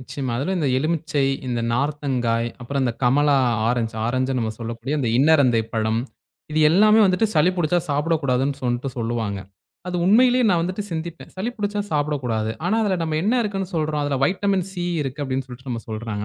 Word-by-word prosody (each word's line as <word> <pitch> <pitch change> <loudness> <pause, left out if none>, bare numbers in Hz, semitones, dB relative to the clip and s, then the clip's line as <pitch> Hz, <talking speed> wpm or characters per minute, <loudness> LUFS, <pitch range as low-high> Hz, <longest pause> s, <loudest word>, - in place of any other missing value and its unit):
நிச்சயமா. 130 0 -5
அதுல 145 +9 -1
இந்த 150 - +1
எலுமிச்சை, 155 -1 0 0.2
இந்த 120 -2 -1
நார்த்தங்காய், 125 -4 0
அப்புறம் 135 +3 -2
இந்தக் 120 -3 -2
கமலா 140 +3 +4 0.3
ஆரஞ்ச் 120 -2 -1
ஆரஞ்ச்ன்னு 130 +2 0
நம்ம 110 -1 -2
சொல்லக்கூடிய 115 +5 -3
அந்த 125 -5 0
இன்னரந்தைப்பழம். 115 -7 +2 0.5
இது 155 - +2
எல்லாமே 215 +5 +5
வந்துட்டு 190 +3 +3
சளி 155 +4 +4
புடிச்சா 175 0 +2
சாப்பிடக்கூடாதுன்னு 140 -3 0
சொல்ட்டு 120 +2 -1
சொல்லுவாங்க. 115 -3 -2 0.5
அது 180 - -2
உண்மையிலே 250 +5 +5
நான் 175 -3 +3
வந்துட்டு 185 +4 -3
சிந்திப்பேன். 165 +1 -6
சளி 210 +6 -2
புடிச்சா 205 -1 -2
சாப்பிட 150 0 +1
கூடாது. 110 -2 -1
ஆனா 190 +5 +1
அதுல 195 -4 +1
நம்ம 160 -1 -1
என்ன 215 - +1
இருக்குன்னு 195 -3 -3
சொல்றோம்? 155 -1 0
அதுல 145 -1 0
வைட்டமின் 195 0 0
சி 175 -2 -4 0.2
இருக்கு 140 +2 -4
அப்படின்னு 130 0 -2
சொல்ட்டு 130 +2 -10
நம்ம 115 -1 -3
சொல்றாங்க. 110 -1 -4
140 Hz, 170 wpm, -22 LUFS, 120-175 Hz, 0.5 s, எல்லாமே